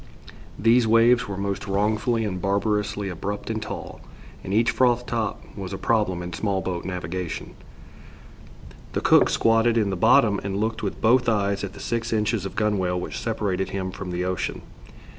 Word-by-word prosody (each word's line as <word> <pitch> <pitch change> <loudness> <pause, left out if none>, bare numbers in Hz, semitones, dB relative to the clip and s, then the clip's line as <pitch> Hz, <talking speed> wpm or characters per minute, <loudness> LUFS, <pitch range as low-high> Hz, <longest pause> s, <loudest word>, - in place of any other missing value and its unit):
These 115 +2 +4
waves 115 +2 +4
were 100 - -5
most 100 +1 -3
wrongfully 110 +3 +1
and 90 -3 -3
barbarously 105 +1 0
abrupt 100 +5 -4
and 110 -1 -3
tall, 110 - -7 0.4
and 95 - -6
each 115 +3 +3
froth 125 -1 +2
top 115 -4 -2
was 95 -1 -6
a - - -3
problem 100 -6 0
in 90 0 -6
small 100 -3 -1
boat 90 -2 -4
navigation. 90 -1 -4 1.4
The - - -1
cook - - +5
squatted 115 +1 +3
in 105 -3 +1
the - - -1
bottom 110 0 +4
and 100 0 -3
looked 110 +2 -1
with - - -4
both 125 +2 +4
eyes 100 -2 0
at 100 -1 -5
the 100 - -11
six 115 +2 -2
inches 105 -2 0
of 95 - -11
gunwale 100 -4 0
which - - -5
separated 100 -5 -2
him 95 -1 -3
from 95 0 -7
the 90 0 -2
ocean. 90 -1 -3
105 Hz, 175 wpm, -24 LUFS, 95-115 Hz, 1.4 s, cook